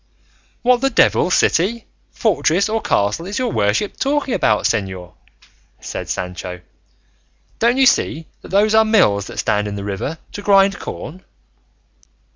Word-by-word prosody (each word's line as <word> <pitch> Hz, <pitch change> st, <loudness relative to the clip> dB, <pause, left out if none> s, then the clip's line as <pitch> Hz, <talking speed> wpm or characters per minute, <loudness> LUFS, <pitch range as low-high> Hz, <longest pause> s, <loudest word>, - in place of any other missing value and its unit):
"What 245 Hz, 0 st, +3 dB
the 270 Hz, -, +2 dB
devil 185 Hz, -, +3 dB
city, 200 Hz, +5 st, +1 dB, 0.2 s
fortress, 195 Hz, -4 st, +1 dB
or 220 Hz, +1 st, -1 dB
castle 105 Hz, -, 0 dB
is 205 Hz, -, -4 dB
your 250 Hz, -3 st, -1 dB
worship 105 Hz, -, 0 dB
talking 275 Hz, -2 st, -1 dB
about, 110 Hz, -, +1 dB
señor?" 95 Hz, -5 st, -2 dB, 0.7 s
said -, -, -7 dB
Sancho; 90 Hz, 0 st, -5 dB, 1.0 s
"don't 235 Hz, +3 st, +2 dB
you 270 Hz, -, +4 dB
see 165 Hz, -9 st, +1 dB, 0.2 s
that -, -, -13 dB
those 210 Hz, +2 st, +2 dB
are 220 Hz, 0 st, +6 dB
mills 145 Hz, -, +2 dB
that -, -, -10 dB
stand 105 Hz, 0 st, 0 dB
in 100 Hz, -, -5 dB
the 100 Hz, -, -6 dB
river 100 Hz, +10 st, -4 dB
to 205 Hz, -, -7 dB
grind 200 Hz, -1 st, +3 dB
corn?" 185 Hz, +5 st, -8 dB
185 Hz, 145 wpm, -19 LUFS, -, 1.0 s, are